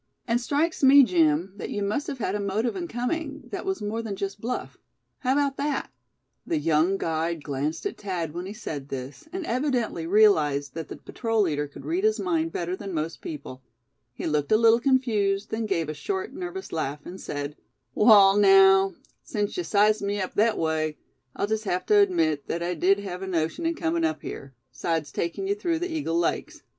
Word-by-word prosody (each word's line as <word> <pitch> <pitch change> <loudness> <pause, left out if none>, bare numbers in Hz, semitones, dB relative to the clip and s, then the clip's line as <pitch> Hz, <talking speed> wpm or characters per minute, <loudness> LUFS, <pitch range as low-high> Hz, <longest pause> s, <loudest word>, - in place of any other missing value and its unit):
And 235 +1 +1
strikes 300 +6 0
me, 275 +1 +8
Jim, 170 - +2
that - - -5
you 205 - -2
must 210 +9 -1
have 275 - -4
had 200 -5 -2
a 210 - -1
motive 205 +4 -1
in 355 -2 -4
coming, 290 +3 -3
that 390 -1 -5
was 385 - -2
more 215 +2 -2
than 215 -3 -4
just 195 +1 -5
bluff. 250 +2 -4 0.4
How 255 0 +1
about 280 -1 +1
that?" 285 -1 -2 0.5
The 335 - -1
young 165 - +2
guide 165 -2 -2
glanced 145 - -3
at 405 - -4
Thad 175 -6 -3
when 175 +2 -5
he 200 - -6
said 145 -10 -6
this, 135 - -7
and 370 -1 -4
evidently 245 - -1
realized 155 -9 +3
that 165 -1 -5
the - - -7
patrol 225 -3 -1
leader 150 -5 -1
could 140 - -12
read 350 +4 -1
his 435 0 +2
mind 330 -3 0
better 175 +1 -2
than 195 -2 -6
most 160 +1 -3
people; 135 -4 -7 0.5
he - - -7
looked 150 -2 0
a 215 - +6
little 230 +1 +5
confused; 220 -7 +1
then 220 0 -2
gave 170 -6 0
a 155 - -3
short 380 - -4
nervous 370 +1 -6
laugh, 145 -2 -3
and 185 +2 -8
said: 145 0 -4 0.4
"Wall, 200 -3 +7
naow, 195 -1 +6 0.3
sense 205 -1 -3
yuh 360 - -2
sized 215 -4 +3
me 200 0 -1
up 185 - -3
thet 215 +1 +3
away, 155 -1 -1 0.4
I'll - - 0
jest 220 +1 -2
hev 180 -1 -1
tuh 210 - +5
admit 165 -7 +2
thet 170 +1 -2
I 175 +1 -1
did 185 +4 +3
hev 185 -2 -6
a 190 - -4
notion 170 - -1
in 335 - 0
comin' 165 - -1
up 155 -2 -1
here, 135 -1 -8 0.2
'sides 155 +2 -2
takin' 170 - -3
ye 395 - +1
through 350 -5 -1
the 350 +2 -3
Eagle 290 - -1
Lakes. 170 - -2
200 Hz, 205 wpm, -26 LUFS, 165-250 Hz, 0.5 s, me